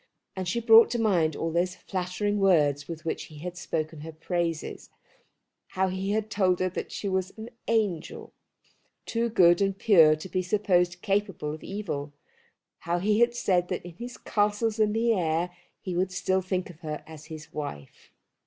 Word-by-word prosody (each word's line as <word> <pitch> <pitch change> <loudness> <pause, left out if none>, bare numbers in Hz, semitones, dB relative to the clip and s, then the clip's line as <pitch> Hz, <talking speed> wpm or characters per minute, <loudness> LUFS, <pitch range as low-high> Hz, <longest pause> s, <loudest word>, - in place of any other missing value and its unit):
And 185 -1 -4
she 195 +7 0
brought 230 0 +7
to 240 - -1
mind 175 -9 +2
all 165 - -2
those 175 +2 0
flattering 195 +2 -2
words 150 -7 +3
with 165 -1 -7
which 160 - -3
he 155 - -13
had 180 +4 -6
spoken 160 -2 -3
her 160 +1 -7
praises, 165 0 -3 0.8
how 190 0 0
he 190 +1 -3
had 215 +1 -1
told 185 -4 +2
her 185 - +1
that 180 - -5
she 205 - -4
was 190 -1 -1
an 220 +2 -8 0.2
angel, 205 -8 -1 0.7
too 235 0 -1
good 180 -4 +5
and 195 -1 +1
pure 165 -8 +6
to 155 +4 -8
be 185 +1 -1
supposed 180 -2 +1
capable 195 -7 -1
of 155 - -9
evil; 160 -8 -4 0.7
how 170 +1 -1
he 210 +4 +2
had 240 0 +3
said 180 -6 +1
that 180 -1 -4
in 175 - -8
his 240 +3 -7
castles 210 +1 0
in 215 -1 +3
the 230 +1 +2
air 175 -1 0 0.3
he 185 -2 -4
would 185 +1 0
still 185 +1 0
think 185 -1 -3
of 165 - -18
her 155 -3 -5
as 155 -1 -11
his 155 -1 -10
wife. 75 - -7
185 Hz, 180 wpm, -27 LUFS, 165-205 Hz, 0.8 s, brought